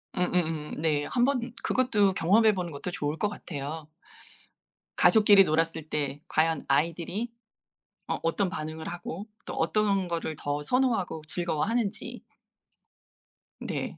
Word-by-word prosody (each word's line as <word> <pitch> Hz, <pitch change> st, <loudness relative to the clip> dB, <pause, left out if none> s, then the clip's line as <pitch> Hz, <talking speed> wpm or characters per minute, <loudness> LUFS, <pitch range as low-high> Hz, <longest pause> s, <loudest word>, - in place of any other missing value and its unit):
음음음 165 Hz, -4 st, 0 dB
네. 150 Hz, -2 st, +1 dB
한번 255 Hz, +1 st, +2 dB, 0.2 s
그것도 210 Hz, -6 st, +2 dB
경험해 210 Hz, +5 st, +4 dB
보는 180 Hz, -3 st, -3 dB
것도 145 Hz, +5 st, -5 dB
좋을 150 Hz, -2 st, -2 dB
것 210 Hz, -, 0 dB
같아요. 155 Hz, -4 st, -6 dB, 1.1 s
가족끼리 210 Hz, -3 st, +7 dB
놀았을 160 Hz, -1 st, 0 dB
때 145 Hz, -1 st, -2 dB
과연 160 Hz, -1 st, +1 dB
아이들이 175 Hz, +8 st, 0 dB, 0.8 s
어 -, -, -1 dB
어떤 180 Hz, +3 st, +1 dB
반응을 155 Hz, -1 st, -5 dB
하고 175 Hz, +3 st, -6 dB, 0.2 s
또 -, -, -5 dB
어떤 195 Hz, +2 st, +1 dB
거를 165 Hz, -2 st, -3 dB
더 145 Hz, 0 st, -2 dB
선호하고 225 Hz, -, +1 dB
즐거워하는지. 195 Hz, +7 st, -2 dB, 1.4 s
네. -, -, -4 dB
170 Hz, 260 characters per minute, -28 LUFS, 155-205 Hz, 1.4 s, 가족끼리